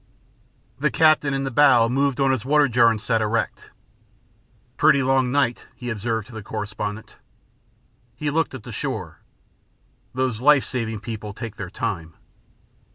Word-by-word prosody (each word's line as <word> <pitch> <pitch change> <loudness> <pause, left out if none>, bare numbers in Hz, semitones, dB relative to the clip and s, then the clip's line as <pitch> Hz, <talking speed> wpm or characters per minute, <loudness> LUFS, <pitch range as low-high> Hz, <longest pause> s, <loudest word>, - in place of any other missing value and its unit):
The 150 +2 +2
captain, 155 +2 +3
in 135 0 -1
the 135 - -3
bow, 130 -4 +5
moved 135 +2 0
on 135 -1 +3
his 130 -5 -1
water 145 +1 +3
jar 120 -1 +4
and 110 -1 -1
sat 115 +1 0
erect. 110 +2 -2 1.1
"Pretty 140 - +4
long 130 -1 +2
night," 135 -3 0
he 125 -1 -5
observed 110 0 -2
to - - -13
the 110 - -6
correspondent. 105 0 -6 1.0
He 145 +4 -2
looked 165 0 0
at - - -9
the - - -9
shore. - - -5 1.0
"Those 130 -3 -1
life 145 0 +5
saving 115 -4 -4
people 110 -2 -6
take 110 -1 -8
their 95 -3 -6
time." 90 -6 -4
120 Hz, 155 wpm, -23 LUFS, 110-135 Hz, 1.1 s, bow